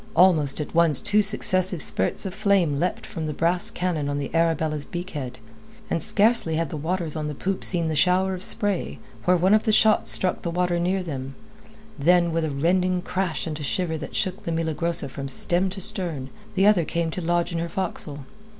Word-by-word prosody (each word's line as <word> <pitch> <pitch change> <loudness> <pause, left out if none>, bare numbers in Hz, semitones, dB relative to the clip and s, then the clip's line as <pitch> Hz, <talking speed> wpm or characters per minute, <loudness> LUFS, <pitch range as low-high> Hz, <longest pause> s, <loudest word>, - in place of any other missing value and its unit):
Almost 160 -6 +4
at 150 - -5
once 165 -5 +4
two 210 +9 +2
successive 185 -3 +2
spurts 95 - 0
of 190 - -4
flame 195 -8 +1
leapt 180 +3 -2
from 160 -2 -5
the 150 - -4
brass 175 +2 +2
cannon 165 -5 -2
on 145 - -2
the 145 0 -5
Arabella's 160 -2 0
beak 175 +4 -7
head, 130 -5 -6 0.5
and 165 - 0
scarcely 210 -5 +2
had 165 -2 -2
the - - -4
watchers 165 +1 -3
on 155 -1 -3
the 150 - -5
poop 190 +6 -3
seen 170 -3 +3
the 160 - -2
shower 185 +4 +2
of 180 - -6
spray, 200 -1 0 0.3
where 180 0 +4
one 185 +4 +3
of 215 - +5
the 220 - 0
shots 215 0 +4
struck 185 - +3
the 170 - -3
water 175 0 0
near 185 +2 0
them, 135 -5 -6 0.6
then 170 +3 +3
with 165 0 -1
a - - -2
rending 180 +5 0
crash 180 -3 -2
and 155 -2 -5
a - - -6
shiver 160 +3 -1
that 155 -2 -7
shook 185 0 -1
the 170 - -3
Milagrosa 165 0 -2
from 140 +1 -7
stem 175 +7 +1
to 190 +1 -6
stern, 165 -8 -3 0.2
the 190 +1 +3
other 205 -5 +4
came 170 +1 -2
to 180 - -5
lodge 175 +1 0
in 170 - -2
her 170 0 -3
forecastle. 155 -6 -5
170 Hz, 210 wpm, -24 LUFS, 155-185 Hz, 0.6 s, of